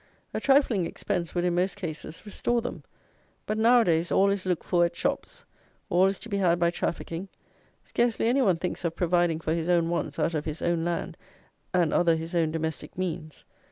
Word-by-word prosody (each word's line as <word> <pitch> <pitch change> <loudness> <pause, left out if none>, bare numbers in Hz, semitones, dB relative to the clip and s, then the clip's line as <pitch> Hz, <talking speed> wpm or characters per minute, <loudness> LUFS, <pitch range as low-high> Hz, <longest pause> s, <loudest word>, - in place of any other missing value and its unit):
A - - -1
trifling 270 - +3
expense 170 -1 -3
would, 175 - +1
in 175 - +1
most 180 +2 0
cases, 165 -2 -6
restore 240 +3 0
them; 245 - -6 0.6
but 215 - -1
now 240 +2 +6
a - - +1
days 165 0 +1
all 200 +1 +4
is 195 -2 -2
looked 180 -3 0
for 175 -2 +2
at 170 0 0
shops: - - -3 0.5
all 180 +2 +5
is 195 0 -1
to - - -9
be 200 -3 -2
had 175 -3 +3
by 170 0 +3
trafficking: 170 +1 -3 0.6
scarcely 235 -1 0
any 260 +4 +3
one 190 -8 +3
thinks 180 +2 -4
of 170 -1 -1
providing 175 -2 +2
for 160 -1 -1
his 165 +1 -2
own 170 -2 +3
wants 170 - -2
out 170 - 0
of 155 -1 -2
his 155 0 -5
own 170 -1 +1
land 170 0 -3 0.5
and 175 -4 +2
other 170 -2 +4
his 165 +2 -5
own 165 -2 +2
domestic 160 -1 -4
means. 170 -4 -4
175 Hz, 205 wpm, -27 LUFS, 165-195 Hz, 0.6 s, now